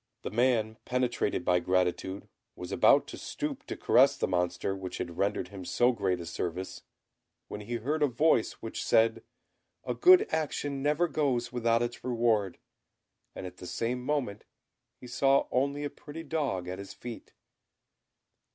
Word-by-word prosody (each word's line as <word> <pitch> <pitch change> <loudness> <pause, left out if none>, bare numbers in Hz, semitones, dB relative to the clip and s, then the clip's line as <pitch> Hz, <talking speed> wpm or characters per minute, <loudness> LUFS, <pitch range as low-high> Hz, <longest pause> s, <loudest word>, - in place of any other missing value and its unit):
The - - -4
man, 115 -2 +1
penetrated 125 -7 -1
by 90 -1 +3
gratitude, 90 +1 -1 0.3
was 90 - -7
about - - +5
to - - -8
stoop - - -5
to - - -5
caress - - +4
the - - 0
Monster 90 +1 -1
which 95 -1 -6
had 85 -1 -5
rendered 100 -2 0
him 95 -1 -8
so 120 +7 +3
great 95 -6 -1
a 85 - -6
service, 85 +2 -4 0.7
when 105 - -6
he 120 +3 -4
heard 145 +7 -2
a 145 - +5
voice 130 -1 +2
which 115 - -4
said, 115 0 +3 0.6
"A - - -2
good 370 +4 +6
action 145 -3 -2
never 150 +5 +2
goes 135 -7 0
without 115 -1 +2
its 120 0 -5
reward," 115 -6 +1 0.8
and - - -6
at 90 0 -8
the 90 - -9
same 125 +5 -2
moment 125 -8 -2 0.6
he - - -12
saw 135 +3 +3
only 140 +3 0
a 145 - -2
pretty 160 +2 -9
dog 140 - -2
at 90 +1 -5
his 100 - -9
feet. 120 -2 -9
115 Hz, 160 wpm, -29 LUFS, 95-135 Hz, 0.8 s, good